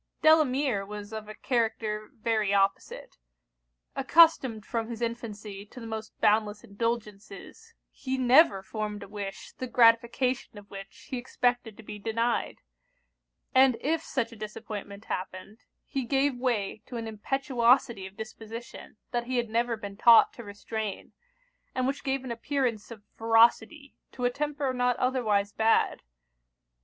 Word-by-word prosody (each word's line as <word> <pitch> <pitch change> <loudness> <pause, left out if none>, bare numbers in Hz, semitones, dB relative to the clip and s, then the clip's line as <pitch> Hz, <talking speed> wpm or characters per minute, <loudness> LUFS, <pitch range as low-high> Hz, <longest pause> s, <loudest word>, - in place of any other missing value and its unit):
Delamere 280 -8 +4
was 205 +1 -8
of 215 -1 -6
a 215 - -8
character 220 -3 -1
very 220 -3 0
opposite. 195 - -1 0.8
Accustomed 270 -6 +4
from 230 -1 -3
his 230 -2 -6
infancy 215 -4 -5
to 250 - -12
the 230 - -8
most 220 -1 -7
boundless 210 -1 +2
indulgences, 230 - -5 0.2
he 265 0 -4
never 255 - +5
formed 210 0 -5
a - - -10
wish, 200 -1 -7
the 255 - -3
gratification 235 0 +2
of 205 0 -13
which 195 -1 -10
he 255 - -2
expected 245 -3 -1
to 225 - -12
be 210 0 -8
denied: 230 +3 -1 0.9
and 260 -2 +5
if 315 +5 0
such 255 -7 -2
a - - -11
disappointment 210 -1 -7
happened, 185 +4 -6 0.3
he 270 - -3
gave 275 +3 +1
way 230 -5 -1
to 245 - -6
an 225 -1 -4
impetuosity 235 -2 +1
of 190 +1 -16
disposition 225 +1 -9
that 240 -1 -1
he 255 0 -1
had 235 -2 -1
never 235 0 0
been 200 -2 -8
taught 230 0 +7
to 235 - -10
restrain, 205 0 -6 0.6
and 255 - 0
which 275 +2 -2
gave 270 -1 -1
an 255 - -5
appearance 235 -3 -2
of 220 -3 -11
ferocity 230 +5 +3 0.2
to 250 - -4
a 245 - +2
temper 290 -1 -2
not 250 -1 +1
otherwise 215 -6 +1
bad. 225 0 +2
230 Hz, 145 wpm, -28 LUFS, 210-255 Hz, 0.9 s, taught